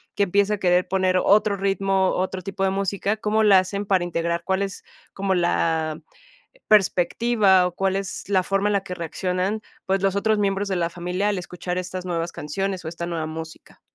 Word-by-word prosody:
que 200 - +2
empieza 200 +2 +2
a - - -9
querer 180 -2 +2
poner 185 -1 +1
otro 205 0 +3
ritmo, 195 -1 +1
otro 185 0 -2
tipo 195 +1 -4
de 190 - +2
música, 200 +2 -1
¿cómo 215 +1 +1
la 200 -3 +7
hacen 200 +2 -3
para 190 -3 +2
integrar? 170 0 -2
¿Cuál 190 +1 0
es 195 -1 -6 0.3
como 195 -1 0
la 160 -2 0 0.7
perspectiva, 195 0 +3
o 180 - -7
cuál 195 +1 0
es 195 0 -4
la 190 -2 +3
forma 195 +2 0
en 210 - +1
la 200 - +1
que 185 - -6
reaccionan? 185 +4 -2 0.3
Pues, 195 0 +1
los 195 0 +2
otros 215 +1 +2
miembros 200 0 0
de 195 - -1
la 170 -1 0
familia 180 +4 -2
al 200 -3 -1
escuchar 180 0 -5
estas 185 0 -5
nuevas 170 -1 -2
canciones 185 +4 -4
o - - -2
esta 170 +1 -5
nueva 165 -2 -3
música. 160 +1 -9
190 Hz, 200 wpm, -23 LUFS, 180-200 Hz, 0.7 s, la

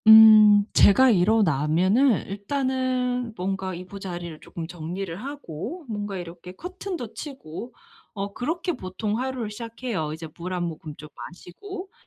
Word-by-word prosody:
음 215 -2 +9
제가 260 +6 +6
일어나면은 190 - +3
일단은 250 +2 -1
뭔가 190 0 -2
이부자리를 175 -3 -7
조금 170 - -7
정리를 175 +1 -5
하고, 285 - -6
뭔가 205 -2 -3
이렇게 175 +1 -8
커튼도 360 - -6
치고 250 - -8 0.4
어 200 -2 -4
그렇게 335 - -2
보통 210 - -3
하루를 255 -4 -3
시작해요. 230 -7 -4
이제 160 +1 -7
물 180 +2 -5
한 180 -1 -1
모금 160 -3 -6
좀 150 - -10
마시고. 375 - -9
205 Hz, 290 characters per minute, -25 LUFS, 175-250 Hz, 0.4 s, 음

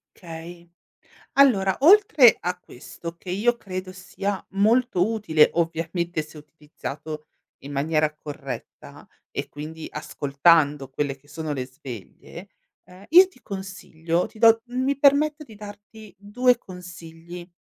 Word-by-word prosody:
Okay. 170 0 -10 0.7
Allora, 200 -9 +4
oltre 325 - +6
a 180 0 -3
questo, 170 +2 -10
che 180 - -9
io 230 +6 +1
credo 185 -3 -7
sia 195 +2 -5
molto 215 -1 +2
utile, 180 -9 +3
ovviamente, 170 0 -1
se 155 0 -13
utilizzato 150 0 -9 0.4
in 140 - -8
maniera 155 +2 0
corretta 140 -5 -9 0.2
e - - -5
quindi 155 +2 -8
ascoltando 145 -1 +2
quelle 140 0 -2
che 140 +2 -27
sono 155 0 -5
le 130 -3 -3
sveglie, 130 - -11 0.4
ehm, 185 +2 -16
io 365 +4 +8
ti 355 -9 -23
consiglio 185 -4 -3
ti - - -16
do 225 0 +6
mi 260 +3 -1
permetto 295 +2 +3
di 225 - -15
darti 205 0 -12
2 245 +5 +2
consigli: 175 -1 -11
175 Hz, 125 wpm, -24 LUFS, 155-215 Hz, 0.7 s, io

